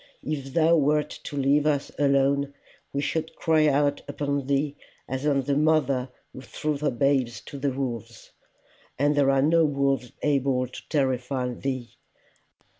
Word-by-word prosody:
If 140 Hz, -3 st, -4 dB
thou 165 Hz, 0 st, +5 dB
wert 150 Hz, 0 st, +2 dB
to 145 Hz, -, -5 dB
leave 140 Hz, +2 st, +3 dB
us 145 Hz, -2 st, 0 dB
alone, 140 Hz, 0 st, +2 dB, 0.4 s
we 140 Hz, -, -1 dB
should 160 Hz, +2 st, -2 dB
cry 155 Hz, -1 st, +3 dB
out 145 Hz, 0 st, +2 dB
upon 140 Hz, -2 st, -2 dB
thee 140 Hz, +1 st, 0 dB, 0.3 s
as 130 Hz, +3 st, -2 dB
on 140 Hz, -2 st, +3 dB
the 140 Hz, +1 st, 0 dB
mother 140 Hz, -4 st, +2 dB, 0.2 s
who 130 Hz, -, -9 dB
threw 150 Hz, +4 st, -3 dB
her 150 Hz, -, +1 dB
babes 130 Hz, -2 st, +1 dB
to 140 Hz, -, -9 dB
the 140 Hz, +1 st, 0 dB
wolves 120 Hz, -3 st, -5 dB, 0.7 s
and 145 Hz, +2 st, +2 dB
there 140 Hz, -1 st, +3 dB
are 135 Hz, 0 st, +3 dB
no 165 Hz, +2 st, +4 dB
wolves 140 Hz, -4 st, 0 dB
able 135 Hz, -3 st, +1 dB
to 125 Hz, -, -11 dB
terrify 130 Hz, -3 st, 0 dB
thee. 130 Hz, -1 st, -4 dB
140 Hz, 155 wpm, -26 LUFS, 130-150 Hz, 0.7 s, thou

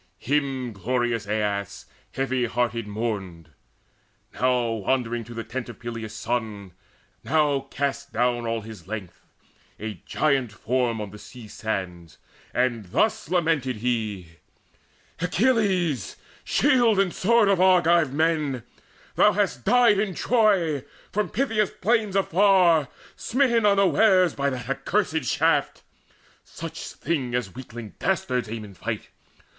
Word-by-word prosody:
Him 135 Hz, -3 st, -1 dB
glorious 120 Hz, +1 st, -1 dB
Aias 100 Hz, -1 st, -2 dB, 0.3 s
heavy 130 Hz, -2 st, 0 dB
hearted 115 Hz, -1 st, -1 dB
mourned, 100 Hz, -6 st, -4 dB, 0.8 s
Now 125 Hz, -2 st, +1 dB
wandering 115 Hz, +2 st, -1 dB
to 120 Hz, +1 st, -10 dB
the 115 Hz, -, -4 dB
tent 120 Hz, +2 st, -5 dB
of 120 Hz, -, -9 dB
Peleus' 115 Hz, -2 st, -6 dB
son, 110 Hz, -4 st, -3 dB, 0.5 s
Now 145 Hz, -3 st, +1 dB
cast 140 Hz, 0 st, -3 dB
down 120 Hz, 0 st, 0 dB
all 115 Hz, 0 st, -1 dB
his 105 Hz, -5 st, -11 dB
length, 100 Hz, -5 st, -7 dB, 0.5 s
a 105 Hz, -5 st, -6 dB
giant 135 Hz, -6 st, +1 dB
form, 120 Hz, +1 st, -1 dB
On 105 Hz, -2 st, -5 dB
the 105 Hz, -, -11 dB
sea 120 Hz, -1 st, -12 dB
sands; 90 Hz, -7 st, -5 dB, 0.3 s
and 120 Hz, -4 st, 0 dB
thus 215 Hz, -, 0 dB
lamented 160 Hz, -8 st, +1 dB
he: 105 Hz, -6 st, -2 dB, 0.9 s
"Achilles, 180 Hz, -, +1 dB, 0.3 s
shield 245 Hz, -7 st, +3 dB
and 195 Hz, -3 st, +2 dB
sword 230 Hz, +2 st, +3 dB
of 195 Hz, -2 st, +3 dB
Argive 175 Hz, -5 st, +4 dB
men, 150 Hz, -4 st, 0 dB, 0.5 s
Thou -, -, +4 dB
hast 120 Hz, 0 st, -1 dB
died 240 Hz, -5 st, +5 dB
in 200 Hz, -3 st, -1 dB
Troy, 195 Hz, -, +2 dB, 0.3 s
from 210 Hz, +1 st, -1 dB
Phthia's 220 Hz, -4 st, +1 dB
plains 215 Hz, -1 st, 0 dB
afar, 185 Hz, -5 st, +4 dB, 0.3 s
Smitten 235 Hz, -4 st, +2 dB
unwares 195 Hz, -2 st, +4 dB
by 140 Hz, 0 st, 0 dB
that 130 Hz, -2 st, -5 dB
accursed 155 Hz, +3 st, -1 dB
shaft, -, -, +1 dB, 0.6 s
Such -, -, -8 dB
thing 135 Hz, -6 st, -2 dB
as 110 Hz, -7 st, -2 dB
weakling 120 Hz, -4 st, -9 dB
dastards 125 Hz, -, -1 dB
aim 110 Hz, -1 st, -5 dB
in 100 Hz, -, -12 dB
fight! 90 Hz, -, -5 dB
130 Hz, 125 wpm, -25 LUFS, 110-180 Hz, 0.9 s, died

